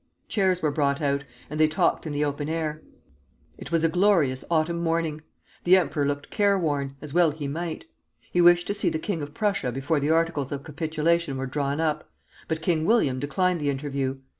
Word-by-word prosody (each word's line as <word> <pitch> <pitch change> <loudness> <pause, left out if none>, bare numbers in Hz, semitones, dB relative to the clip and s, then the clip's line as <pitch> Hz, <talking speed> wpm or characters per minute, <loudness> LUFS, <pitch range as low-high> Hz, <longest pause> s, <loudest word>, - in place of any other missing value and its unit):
Chairs 185 -4 +1
were 150 - +2
brought 140 0 +1
out, 140 -2 0 0.2
and 150 +1 -5
they 155 - +6
talked 155 +1 +1
in - - -3
the 145 +1 0
open 145 +1 -3
air. 155 -1 -2 0.8
It - - -9
was 165 -1 +2
a - - +5
glorious 170 -7 +2
autumn 170 +1 +1
morning. 165 -2 -1 0.4
The 185 +2 +6
emperor 150 -5 0
looked 145 0 -3
care 200 -1 +3
worn, 145 -5 -1
as 150 -2 -7
well 175 -1 +5
he 150 -1 -5
might. 170 - -4 0.5
He 175 - +3
wished 175 0 +6
to - - -1
see 205 - 0
the - - -2
king 165 0 -3
of 145 +1 -7
Prussia 200 - 0
before 135 +5 0
the 145 +2 -1
articles 160 -4 +1
of 140 -1 -4
capitulation 160 0 -1
were 135 - -2
drawn 140 +2 -2
up: 155 -2 -1 0.4
but 160 0 -3
King 165 -2 +1
William 160 - +2
declined 180 +5 0
the 145 - 0
interview. 135 -1 -2
155 Hz, 200 wpm, -25 LUFS, 145-170 Hz, 0.8 s, they